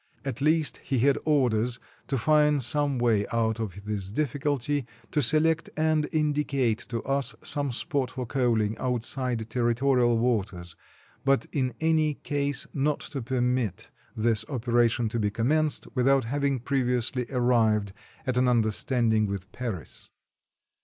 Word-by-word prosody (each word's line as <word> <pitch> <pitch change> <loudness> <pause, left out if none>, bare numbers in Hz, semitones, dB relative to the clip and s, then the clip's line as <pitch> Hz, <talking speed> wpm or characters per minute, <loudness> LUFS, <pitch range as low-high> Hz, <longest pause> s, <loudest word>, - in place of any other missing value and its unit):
At 135 0 -4
least 155 +1 +2
he 135 - -3
had 135 +3 +3
orders 125 -5 +1 0.3
to 135 - -1
find 150 +2 +3
some 145 +2 0
way 115 -4 +2
out 115 -1 0
of 100 -2 -5
this 100 -3 -2
difficulty, 145 0 -1 0.2
to 150 - +1
select 155 +5 +3
and 155 -1 +1
indicate 145 -7 0
to 115 -2 -3
us 140 0 0
some 145 -2 0
spot 130 +1 -1
for 130 -1 -5
coaling 115 -4 +1
outside 125 -1 -1
territorial 120 +1 +2
waters, 100 -8 -1 0.5
but 135 0 +2
in 130 -4 -1
any 155 -2 +2
case 145 -1 -2
not 145 +1 0
to 140 -2 -5
permit 120 -4 -1 0.3
this 110 -1 +2
operation 120 -1 +1
to 115 - -2
be 105 -1 +1
commenced, 145 +8 +1
without 135 +1 +3
having 140 +2 0
previously 125 -2 0
arrived 115 -6 +2 0.3
at 130 -2 -1
an 125 0 +3
understanding 115 -1 +2
with 100 -1 -5
Paris. 110 - -6
125 Hz, 135 wpm, -27 LUFS, 115-140 Hz, 0.5 s, had